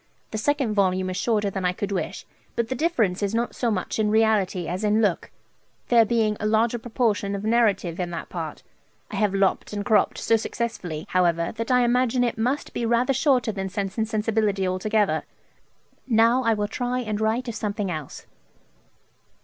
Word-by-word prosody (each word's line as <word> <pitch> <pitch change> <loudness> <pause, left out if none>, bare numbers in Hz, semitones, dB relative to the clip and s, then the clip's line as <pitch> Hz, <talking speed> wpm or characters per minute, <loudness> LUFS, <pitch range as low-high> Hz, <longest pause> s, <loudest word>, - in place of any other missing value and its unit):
The 215 - -3
second 275 -2 0
volume 185 -2 +1
is 185 - -4
shorter 210 -4 0
than 190 -1 -4
I 180 0 +1
could 200 +2 -4
wish, 190 - -3 0.3
but 235 -1 -1
the - - 0
difference 235 - 0
is 205 +2 -1
not 235 +1 -1
so 240 - -1
much 210 0 -2
in 215 -1 +2
reality 210 -5 +2
as 180 +4 -3
in 210 +1 +3
look, 205 -6 0 0.6
there 235 -2 +6
being 220 -1 +1
a 210 - -1
larger 225 +2 +2
proportion 220 -4 -1
of 200 - -5
narrative 210 -7 +1
in 180 -1 -2
that 170 - -5
part. - - -6 0.5
I - - -4
have 210 -3 +1
lop't 195 +1 +1
and 205 -1 -3
crop't 210 -2 +3
so 225 - +2
successfully, 195 -9 -4
however, 170 -2 +1
that 230 +2 -4
I 250 -1 +4
imagine 245 0 +2
it 235 -2 -1
must 255 +6 -1
be - - -3
rather 235 +3 +2
shorter 260 -4 +2
than 195 -2 -4
"Sense 195 -1 -3
and 220 0 0
Sensibility" 215 -3 0
altogether. 205 +3 +1 0.9
Now 230 +1 +4
I 230 -3 +2
will 210 0 -1
try 245 +3 -2
and 215 -3 -3
write 225 +4 0
of 235 - -3
something 205 -3 -3
else.' 155 -4 -7
215 Hz, 190 wpm, -24 LUFS, 195-235 Hz, 0.9 s, there